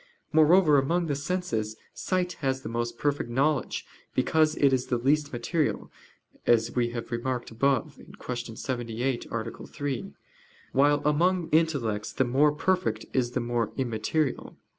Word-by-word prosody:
Moreover, 155 -1 +6
among 170 +6 +1
the 145 -3 -1
senses, 140 -9 -2 0.2
sight 180 -1 -1
has 135 -1 -1
the - - -5
most 120 0 -3
perfect 145 -3 -1
knowledge, 140 +5 0 0.3
because 155 +4 +3
it 140 -2 +3
is 130 -1 0
the 125 - +1
least 145 +4 +1
material, 145 +6 -1 0.6
as 115 -1 +3
we 120 -1 +2
have 120 +1 -6
remarked 120 +1 -2
above 135 +4 0 0.2
(Q. 120 -2 -5
78, 120 +1 -3
A. 115 0 -4
3): 145 +6 -4 0.6
while 145 +1 +3
among 170 +4 +2
intellects 140 -10 +1
the 130 - +2
more 140 +5 +4
perfect 185 +5 0
is 125 -2 0
the - - 0
more 120 -2 -1
immaterial. 130 +4 -1
135 Hz, 140 wpm, -27 LUFS, 120-155 Hz, 0.6 s, Moreover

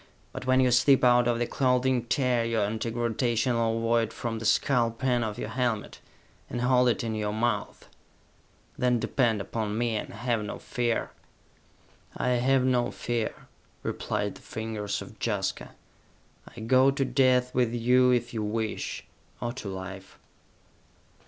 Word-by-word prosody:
But, 130 - -7
when 130 0 +4
you 130 -1 +4
slip 130 +3 +4
out 120 -1 +5
of 120 -1 +1
your 120 - 0
clothing, 125 -1 +1
tear 125 0 +1
your 115 -2 0
anti 110 +2 -3
gravitational 115 0 0
ovoid 115 0 +1
from 115 -2 -4
the 115 - -6
skull 120 +1 +3
pan 120 +1 0
of 105 -2 -4
your - - -4
helmet, 120 -3 -2 0.5
and 120 - -3
hold 125 0 +4
it 120 - 0
in 115 -1 -2
your 105 -1 -2
mouth! 110 -1 -2 0.9
Then 125 -1 +3
depend 115 -4 +1
upon 110 0 -3
me, 120 -1 0
and 105 - -4
have 115 0 -1
no 105 - -5
fear!" 120 -3 -2 1.1
"I - - 0
have 125 +1 +2
no 125 -2 +2
fear," 120 -2 -3 0.4
replied - - -2
the - - -15
fingers 110 -2 -4
of - - -14
Jaska. - - -2 0.7
"I - - -12
go 130 +4 +4
to 135 0 0
death 125 -1 +2
with 125 -2 +2
you 125 +2 +3
if 120 -1 +1
you 110 - -2
wish 110 +1 -3 0.3
or 120 0 -3
to 120 -6 -6
Life!" 95 0 -8
120 Hz, 155 wpm, -27 LUFS, 110-125 Hz, 1.1 s, out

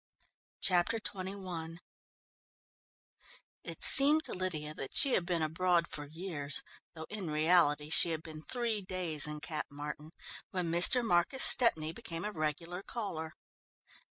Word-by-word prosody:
Chapter 185 +4 0
XXI 185 -5 -7 1.9
It - - -8
seemed 295 +3 +9
to - - -4
Lydia 155 -5 -5
that 135 - -9
she 275 - +4
had 175 - -1
been 170 -3 -2
abroad 170 +2 -1
for 145 - -8
years, 155 -3 -2 0.3
though 160 0 -9
in 200 -6 -7
reality 150 -1 +1
she 170 - +8
had 160 -1 -5
been 155 -2 -11
three 230 +2 -3
days 180 -6 0
in 150 0 -7
Cap 155 -1 -6
Martin, 150 +1 -9 0.4
when 180 -3 -4
Mr. 180 +9 +5
Marcus 180 +7 +1
Stepney 160 -11 +3
became 170 -3 -8
a 210 - -4
regular 165 +2 -5
caller. 170 -9 -7
170 Hz, 135 wpm, -30 LUFS, 155-190 Hz, 1.9 s, seemed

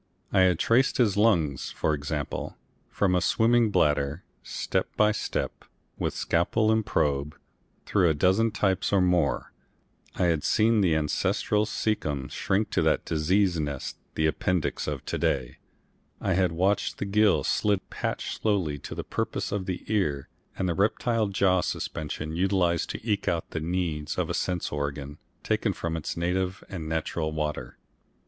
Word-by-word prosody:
I 95 - +4
had 90 -3 +4
traced 125 +8 +3
his 110 -6 +3
lungs, 85 - +2
for 80 - 0
example, 75 0 -4 0.3
from 95 -2 +1
a 90 - +3
swimming 115 +4 +3
bladder, 75 -3 +1 0.2
step - - -2
by 105 0 +5
step, 105 - -3 0.4
with - - -1
scalpel 110 +6 +1
and 110 0 +2
probe, 75 -7 0 0.5
through 90 -4 +3
a 80 - +1
dozen 95 +9 +3
types 100 -4 0
or 100 - +4
more, 85 -8 +1 0.6
I - - 0
had 85 -4 +2
seen 110 0 +3
the 85 -5 +3
ancestral 105 +7 +1
caecum 75 -12 -2
shrink 100 +3 0
to - - +2
that - - +2
disease 90 +3 +2
nest, 70 -3 -3 0.2
the 80 - +1
appendix 80 +2 0
of - - -4
to - - -3
day, - - -1 0.6
I 95 - 0
had 90 -1 +2
watched 95 +5 0
the - - -3
gill 105 0 +3
slit 100 -2 +1
patched - - -3
slowly 90 -9 0
to 70 - -7
the - - -4
purposes - - -3
of 100 -2 -2
the 90 -2 -3
ear 75 -11 -1 0.3
and 95 - 0
the 85 - +1
reptile 110 +4 +1
jaw 95 -2 +2
suspension 80 -1 -4
utilised 90 -2 +1
to - - -6
eke 105 -2 0
out 85 -1 -1
the 80 - -2
needs 80 -3 -2
of - - 0
a - - -1
sense 90 -2 -2
organ 70 0 -4 0.2
taken - - 0
from 85 -1 -3
its 80 0 -4
native 90 +2 -1
and 80 -5 -5
natural 80 0 -2
water. 75 -1 -3
90 Hz, 160 wpm, -27 LUFS, 75-100 Hz, 0.6 s, by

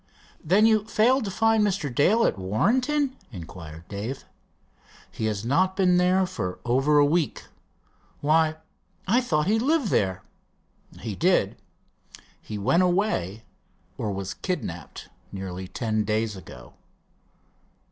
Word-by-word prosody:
"Then 195 +7 +4
you 215 -2 +3
failed 230 +3 +2
to - - -3
find 225 +2 +2
Mr. 190 -10 -1
Dale 205 - +3
at - - +1
Warrenton?" 255 - +1 0.2
inquired 85 -4 -10
Dave. 110 +7 -5 0.9
"He 110 - -4
has 105 0 -2
not 185 +9 +2
been 180 -2 +3
there 185 +1 +3
for 125 - -4
over 135 +5 +3
a 145 - +6
week." 155 0 0 0.8
"Why, 155 +1 +2 0.5
I 235 +7 +3
thought 155 -11 0
he 215 +4 +2
lived 280 -1 +1
there?" 95 - 0 0.8
"He - - -4
did. - - +2 0.9
He 105 - -6
went 110 - +2
away, 175 - 0 0.5
or 105 - -3
was 95 -1 -4
kidnapped, 105 - -5 0.2
nearly 95 -1 -6
ten 110 +1 -1
days 110 0 -1
ago." 95 - -12
150 Hz, 125 wpm, -25 LUFS, -, 0.9 s, a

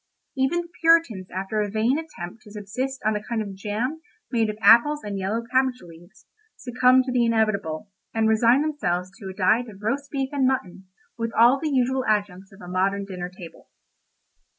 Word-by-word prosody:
Even 270 +6 +1
the 345 - -11
Puritans 325 - +3
after 195 +4 -2
a 205 - -2
vain 225 +7 +1
attempt 225 - -9
to 210 - -15
subsist 250 +6 -5
on 215 0 +2
a 210 - -2
kind 225 +1 -3
of 205 -2 -4
jam 220 +10 -3 0.3
made 225 -3 +1
of 210 - -5
apples 235 +8 +5
and 200 -1 -4
yellow 210 +5 -2
cabbage 260 -1 +2
leaves, 175 +1 -16 0.3
succumbed 255 +1 +3
to 260 - -3
the 245 -1 +2
inevitable, 215 -7 0 0.2
and 225 -1 +1
resigned 235 +5 +4
themselves 185 - -2
to 195 - -7
a - - -7
diet 220 +5 +2
of 205 -1 -14
roast 275 +6 -2
beef 270 -2 -2
and 270 -2 +2
mutton, 190 -7 -3 0.3
with 230 0 -2
all 240 +4 +6
the 310 - -2
usual 260 -1 +1
adjuncts 200 -3 -1
of 195 - -16
a 180 - -10
modern 195 +2 0
dinner 180 -2 -6
table. 180 -2 -13
220 Hz, 190 wpm, -24 LUFS, 195-260 Hz, 0.3 s, all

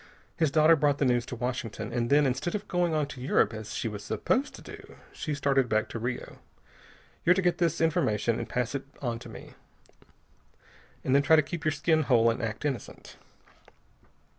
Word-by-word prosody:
His 160 -3 +2
daughter 155 +3 +5
brought 145 -2 +2
the 145 - +1
news 120 -2 +1
to - - -5
Washington, 120 -3 -4
and 120 -1 -1
then 145 +1 +5
instead 135 +8 -1
of 205 0 -5
going 175 -3 0
on 150 -1 +1
to 135 -3 -9
Europe 130 - +2
as 110 0 -7
she - - -2
was 105 -2 -6
supposed 270 +3 -1
to - - -13
do, - - -12 0.2
she 150 - -3
started 135 -3 +1
back 110 0 +1
to 115 - -5
Rio. 120 +2 -5 0.8
You're 180 +2 +5
to 190 - +1
get 175 -1 +1
this 170 -2 +1
formation 135 - +1
and - - -5
pass 125 -1 -1
it 135 -1 -4
on 120 -3 -3
to - - -11
me, - - -11 1.5
then 135 +2 +3
try 160 +3 +5
to 155 - +4
keep 160 +2 -6
your 155 - +2
skin 155 +2 +2
whole 115 -5 +4
and 115 - -4
act 110 +4 -4
innocent. 135 -7 -5
140 Hz, 195 wpm, -28 LUFS, 120-160 Hz, 1.5 s, daughter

